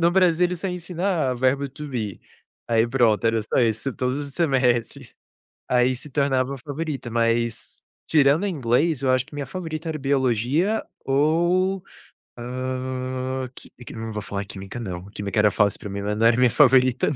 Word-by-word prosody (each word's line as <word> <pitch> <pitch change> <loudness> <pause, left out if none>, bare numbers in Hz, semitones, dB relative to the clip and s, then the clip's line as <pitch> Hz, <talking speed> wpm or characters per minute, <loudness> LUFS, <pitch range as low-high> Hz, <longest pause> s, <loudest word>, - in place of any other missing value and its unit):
no 170 +1 +4
Brasil, 180 -2 +3
ele 180 0 -4
só 190 +3 -3
ensinar 175 -5 -1
verbo 130 +3 +1
to 150 +2 -8
be. 110 -8 -4 0.5
Aí, 115 -1 +3
pronto. 115 -3 +2
Era 115 0 +2
só 110 - -3
isso 115 +2 +1
todos 130 +2 -1
os 140 -2 -6
semestres. 130 -4 0 0.5
Aí 125 +1 +3
se 145 +4 -10
tornava 135 -1 +1
a - - -9
favorita. 145 -1 -5
Mas, 115 0 -1 0.3
tirando 150 +4 +4
inglês, 145 -1 +1
eu 135 - +1
acho 130 0 +2
que - - -19
minha 145 -1 -4
favorita 165 -3 -5
era 155 - -3
biologia 135 - +1 0.2
ou, 175 +7 +2 0.5
hã, 130 +1 -4
qui - - -14 0.2
quim - - -9
eu - - -7
não 115 0 -5
vou 105 - -3
falar 100 0 -4
química, 100 +3 -8
não. 90 -5 -5
Química 100 +1 -2
era 105 0 +5
fácil 105 -1 +1
pra 105 - -7
mim, 100 0 -4
mas 105 +1 -2
não 115 - +2
era 115 - +4
minha 125 -1 +4
favorita, 130 -2 +4
não. - - -3
130 Hz, 180 wpm, -23 LUFS, 115-150 Hz, 0.5 s, era